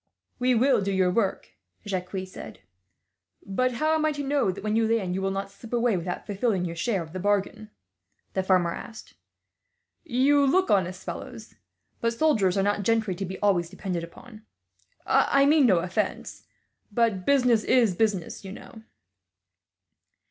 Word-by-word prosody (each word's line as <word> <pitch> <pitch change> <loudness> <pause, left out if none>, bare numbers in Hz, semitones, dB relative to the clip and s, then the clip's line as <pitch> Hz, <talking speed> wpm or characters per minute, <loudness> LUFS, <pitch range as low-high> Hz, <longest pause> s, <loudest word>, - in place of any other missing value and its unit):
"We 250 0 +2
will 255 -1 +3
do 200 0 -1
your 185 -1 +2
work," 195 -1 -1 0.3
Jacques 190 -1 -4
said. 185 -11 -11 0.8
"But 255 +6 0
how 310 +6 +1
am 315 -1 +1
I 310 - +2
to 285 0 -4
know 280 -6 +1
that, 195 +2 -5
when 215 0 -1
you 225 0 +2
land, 215 -5 0
you 190 - -2
will 195 - 0
not 195 0 -4
slip 220 +4 -12
away 235 -2 +2
without 180 0 -4
fulfilling 200 -2 -1
your 170 -1 -5
share 185 +2 -1
of 160 0 -13
the 185 - -4
bargain?" 205 +2 -1 0.6
the 190 - 0
farmer 185 -2 +2
asked. 225 -1 -10 0.9
"You 285 -1 +3
look 370 +8 +2
honest 185 -2 0
fellows, - - -8 0.5
but 230 0 0
soldiers 220 - +2
are 195 - +2
not 205 +1 0
gentry 220 -1 +1
to 195 +2 -4
be 190 +1 -6
always 180 -5 +2
depended 175 -2 -4
upon. 215 +6 -12 0.6
I 275 0 +3
mean 290 -2 +5
no 190 -5 +4
offence, 175 +2 -3 0.4
but 215 -4 +1
business 250 -3 +3
is 235 -7 +3
business, 205 -5 -1
you 190 0 -8
know." 220 +1 -12
205 Hz, 165 wpm, -26 LUFS, 185-245 Hz, 0.9 s, mean